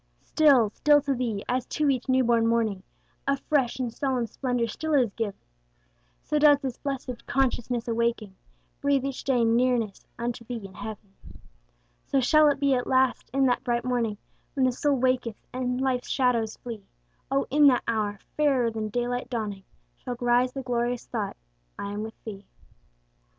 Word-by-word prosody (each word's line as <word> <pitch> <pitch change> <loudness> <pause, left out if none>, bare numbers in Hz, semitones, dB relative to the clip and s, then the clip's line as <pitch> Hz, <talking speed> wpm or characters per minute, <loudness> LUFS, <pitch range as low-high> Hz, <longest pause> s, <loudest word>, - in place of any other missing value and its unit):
Still, 270 -9 +4
still 295 +6 +4
to 280 0 0
Thee, 235 -5 -2
as 250 0 -1
to 300 - 0
each 255 -1 -3
new 260 0 +4
born 230 -1 +3
morning, 225 -4 +1 0.5
A 275 0 +2
fresh 270 -3 0
and 245 -3 -3
solemn 260 -3 -1
splendor 245 +1 -1
still 315 +7 -2
is 245 -7 +2
giv'n, 220 -4 -3 0.9
So 300 - 0
does 295 -1 +7
this 265 -4 -5
blessed 260 -4 -5
consciousness 245 -2 0
awaking, 230 -3 -1 0.5
Breathe 280 -1 +2
each 275 -2 -4
day 250 -4 +2
nearness 230 -3 +1
unto 240 0 -3
Thee 230 -3 -6
and 190 -1 -11
heav'n. 210 -1 -8 0.9
So 275 - +2
shall 305 +4 +5
it 285 -2 +2
be 280 -1 +3
at 245 -1 0
last 260 -1 +2
in 270 +1 +2
that 245 -1 +1
bright 240 0 -1
morning, 235 -4 0 0.4
When 265 -2 +3
the 255 - +3
soul 285 +3 +1
waketh, 255 -3 0
and 250 0 -1
life's 260 -2 -1
shadows 240 -4 +1
flee; 225 -5 -8 0.4
O 275 +1 +1
in 295 +1 +6
that 250 -3 +4
hour, 210 -3 -1 0.2
fairer 270 -6 +2
than 220 -1 -3
daylight 245 +2 -2
dawning, 210 -5 -4 0.3
Shall 245 - -6
rise 245 +1 +3
the 270 - -5
glorious 245 -1 -1
thought 215 -4 -4 0.4
I 200 - -4
am 205 +1 -4
with 220 0 -6
Thee. 200 -3 -8
245 Hz, 170 wpm, -26 LUFS, 230-265 Hz, 0.9 s, does